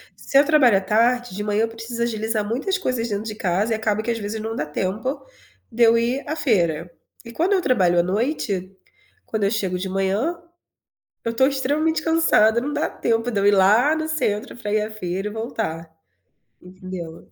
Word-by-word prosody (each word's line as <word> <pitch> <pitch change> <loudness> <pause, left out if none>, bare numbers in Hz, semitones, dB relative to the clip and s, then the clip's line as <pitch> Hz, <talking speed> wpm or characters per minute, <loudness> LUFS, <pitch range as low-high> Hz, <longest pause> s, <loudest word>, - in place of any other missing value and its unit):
Se 275 - 0
eu 280 - +6
trabalho 275 -9 +5
à - - -1
tarde, 230 +2 +1
de 205 - -4
manhã 210 0 0
eu - - +1
preciso 225 +1 -5
agilizar 220 -2 -1
muitas 285 - -1
coisas 255 -10 -2
dentro 205 0 -2
de 220 -1 -5
casa, 200 +2 0
e - - +1
acaba 215 -1 -1
que, 235 - -1
às 230 - -3
vezes, 210 +1 -4
não 225 +1 -4
dá 150 - -2
tempo 200 - -3 0.5
de 235 +1 -4
eu 230 0 +6
ir 245 +4 0
à 310 - -1
feira. 175 - 0 0.3
E 235 - -9
quando 340 - +1
eu 380 - +2
trabalho 185 - +3
à - - +4
noite, 195 - -2 0.5
quando 220 -2 -3
eu 200 - +3
chego 190 -5 -1
de 190 +1 -4
manhã, 195 - 0 0.9
eu 230 - -1
tô 260 +3 +4
extremamente 295 +4 0
cansada, 310 -9 +3
não 290 +4 -3
dá 295 - -1
tempo 230 +1 -1
de 210 - 0
eu 200 - +1
ir 205 - +6
lá 210 +10 +4
no 315 0 -2
centro 260 -6 -2
pra 210 -3 -4
ir 215 - +2
à 210 - -3
feira 195 -1 -4
e - - -5
voltar, 220 -7 -4 0.7
entendeu? 180 -3 -9
220 Hz, 205 wpm, -22 LUFS, 195-255 Hz, 0.9 s, eu